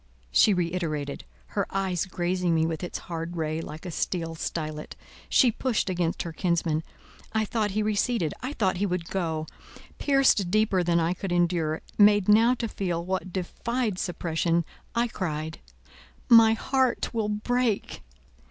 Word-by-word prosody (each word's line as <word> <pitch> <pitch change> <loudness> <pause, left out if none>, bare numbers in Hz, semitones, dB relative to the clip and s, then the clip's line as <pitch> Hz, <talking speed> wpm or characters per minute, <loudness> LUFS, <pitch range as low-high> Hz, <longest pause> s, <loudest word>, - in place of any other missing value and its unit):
she 210 - +5
reiterated, 165 -6 -2 0.2
her 200 -2 -1
eye 195 -2 -1
grazing 180 -1 0
me 160 0 +3
with 165 +1 -3
its 175 - -4
hard 170 0 -5
ray 155 0 -1
like 155 +2 -8
a 180 - -4
steel 165 0 -2
stylet. 155 -1 -4 0.3
She 250 -4 +5
pushed 225 -4 -1
against 175 -2 -1
her 170 - -5
kinsman. 165 -2 0 0.5
I 220 0 +1
thought 215 -1 0
he 215 - +2
receded; 210 - 0
I 260 +4 -4
thought 190 -8 0
he 200 +2 0
would 180 -2 -3
go. 160 -4 -1 0.5
Pierced 275 -9 +3
deeper 210 -2 +2
than 170 -1 +2
I 165 +1 +1
could 185 0 -5
endure, 170 -3 +1 0.2
made 205 -1 +6
now 225 +4 +5
to 235 -1 -3
feel 175 -5 -3
what 185 0 -2
defied 210 +3 -2
suppression, 170 -1 0 0.3
I 235 +1 +2
cried— 160 -7 -4 0.7
"My 225 -1 +8
heart 260 +2 0
will 220 -2 0
break!" 225 +1 -1
180 Hz, 150 wpm, -27 LUFS, 165-215 Hz, 0.7 s, My